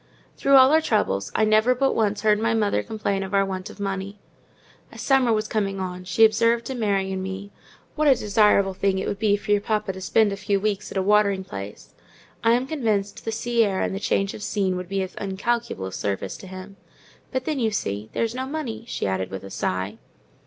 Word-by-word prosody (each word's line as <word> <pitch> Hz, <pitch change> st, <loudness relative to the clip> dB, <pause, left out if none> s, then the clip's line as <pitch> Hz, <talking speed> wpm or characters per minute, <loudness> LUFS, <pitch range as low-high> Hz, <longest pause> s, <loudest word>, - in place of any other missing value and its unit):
Through 275 Hz, -, +3 dB
all 260 Hz, 0 st, +8 dB
our 315 Hz, +1 st, +5 dB
troubles, 100 Hz, -, 0 dB
I 220 Hz, -, +3 dB
never 215 Hz, +4 st, +4 dB
but 270 Hz, +1 st, +2 dB
once 210 Hz, -2 st, 0 dB
heard 210 Hz, -1 st, +4 dB
my 225 Hz, +1 st, +1 dB
mother 210 Hz, -2 st, +1 dB
complain 210 Hz, -3 st, -2 dB
of 195 Hz, +1 st, -3 dB
our 195 Hz, 0 st, +4 dB
want 185 Hz, -1 st, -5 dB
of -, -, -13 dB
money. 195 Hz, 0 st, -4 dB, 0.7 s
As -, -, -12 dB
summer 265 Hz, -3 st, +3 dB
was 215 Hz, -1 st, 0 dB
coming 195 Hz, -3 st, -1 dB
on 180 Hz, -1 st, -5 dB
she 195 Hz, +5 st, +5 dB
observed 230 Hz, +2 st, +2 dB
to 265 Hz, -, -4 dB
Mary 200 Hz, -5 st, 0 dB
and 190 Hz, 0 st, -3 dB
me, 190 Hz, +2 st, -6 dB, 0.4 s
"What 305 Hz, 0 st, +2 dB
a 275 Hz, -, +7 dB
desirable 210 Hz, -3 st, +3 dB
thing 195 Hz, 0 st, 0 dB
it 190 Hz, -, -2 dB
would 200 Hz, -, -3 dB
be 205 Hz, -1 st, +3 dB
for 205 Hz, -, -5 dB
your 205 Hz, -1 st, +4 dB
papa 210 Hz, -2 st, -1 dB
to 190 Hz, -, -9 dB
spend 205 Hz, +2 st, +2 dB
a -, -, -5 dB
few 200 Hz, 0 st, 0 dB
weeks 205 Hz, 0 st, -2 dB
at -, -, -4 dB
a 190 Hz, -, +1 dB
watering 200 Hz, -1 st, +3 dB
place. 100 Hz, -, -9 dB, 0.5 s
I 230 Hz, -, +5 dB
am 250 Hz, +2 st, +1 dB
convinced 220 Hz, -9 st, -2 dB
the 225 Hz, -, -1 dB
sea 235 Hz, +1 st, +1 dB
air 195 Hz, -3 st, 0 dB
and -, -, -1 dB
the 195 Hz, -, -3 dB
change 195 Hz, -1 st, 0 dB
of -, -, -9 dB
scene 195 Hz, -3 st, 0 dB
would 180 Hz, -1 st, -5 dB
be 195 Hz, -1 st, 0 dB
of 185 Hz, -, -8 dB
incalculable 200 Hz, -, -2 dB
service 95 Hz, 0 st, -3 dB
to 190 Hz, -, -11 dB
him. 190 Hz, +1 st, -10 dB, 0.5 s
But 260 Hz, -1 st, -2 dB
then, 305 Hz, -3 st, -1 dB
you 225 Hz, -3 st, +2 dB
see, 105 Hz, -, -3 dB
there's 230 Hz, 0 st, -1 dB
no 260 Hz, +1 st, -4 dB
money," 250 Hz, -7 st, -5 dB
she -, -, -3 dB
added, 95 Hz, -1 st, -1 dB
with 95 Hz, 0 st, -7 dB
a 95 Hz, -, -9 dB
sigh. 95 Hz, +5 st, -3 dB
205 Hz, 225 wpm, -24 LUFS, 190-225 Hz, 0.7 s, all